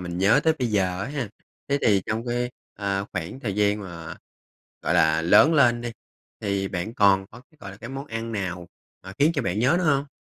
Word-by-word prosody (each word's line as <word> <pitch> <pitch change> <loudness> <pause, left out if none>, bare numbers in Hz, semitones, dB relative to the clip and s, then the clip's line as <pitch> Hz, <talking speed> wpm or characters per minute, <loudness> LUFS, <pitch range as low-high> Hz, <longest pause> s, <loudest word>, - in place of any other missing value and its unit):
mình 90 0 -5
nhớ 100 +3 +4
tới 160 - +5
bây 125 -2 0
giờ 95 -3 0
á 120 - -4
ha. 140 -6 -3 0.4
Thế 140 - +1
thì 100 -3 +3
trong 110 +3 -2
cái, 120 0 -1 0.2
ờ, 100 -1 -2
khoảng 90 +7 -5
thời 100 -8 -3
gian 105 0 +2
mà, 85 -4 -8 0.7
gọi - - 0
là, - - +3
lớn 160 - +6
lên 120 -4 +4
đi 120 -1 -5 0.5
thì 100 -2 -1
bạn 95 +6 -4
còn 95 -1 +4
có 120 - -13
cái, 155 - -27
gọi 100 - -8
là, 95 - -11
cái 115 +4 -9
món 135 +2 -6
ăn 115 -1 -5
nào 90 -4 -4 0.4
mà 95 0 -9
khiến 155 +4 +4
cho 140 - 0
bạn 95 +1 -1
nhớ 130 +8 +3
nữa 180 - -1
hông? 140 -2 +2
105 Hz, 230 wpm, -25 LUFS, 95-125 Hz, 0.7 s, lớn